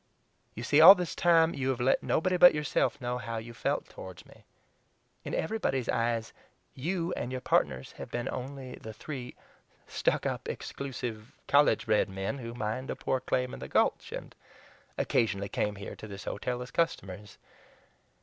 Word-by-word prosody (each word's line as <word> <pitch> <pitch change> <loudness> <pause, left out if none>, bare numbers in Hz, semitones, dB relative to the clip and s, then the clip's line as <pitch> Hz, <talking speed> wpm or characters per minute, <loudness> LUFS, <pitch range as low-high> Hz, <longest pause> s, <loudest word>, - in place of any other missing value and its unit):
You 115 - -6
see, 145 +4 +4
all 185 +5 +12
this 180 -3 -3
time 165 -1 +4
you 135 -1 -2
have 130 -2 -1
let 125 +2 +3
nobody 185 +3 +1
but 180 -2 +8
yourself 150 -1 0
know 125 -1 -2
how 115 0 -4
you 115 +1 -7
felt 115 - -1
toward 95 -1 -10
me. - - -19 0.8
In - - -3
everybody's 145 - -1
eyes 115 -1 0 0.4
YOU 170 +5 -2
and 120 - -4
your 130 - -3
partners 65 - 0
have - - -7
been 120 0 -3
only 130 0 -6
the 110 - -9
three 125 +2 -7 0.5
stuck - - 0
up, - - -3
exclusive, 120 -5 -6
college 145 +1 +4
bred 105 -1 +2
men 95 +8 -3
who 115 -1 -7
mined 120 +3 -3
a - - -2
poor 130 - -1
claim 125 0 -1
in - - -7
the - - -6
Gulch, - - +1
and - - -7 0.6
occasionally 100 -3 0
came 105 0 -1
here 100 -1 -7
to 110 - -9
this 100 -1 -8
hotel 125 +4 -3
as 125 - -11
customers. 100 - -2
125 Hz, 170 wpm, -30 LUFS, 110-140 Hz, 0.8 s, all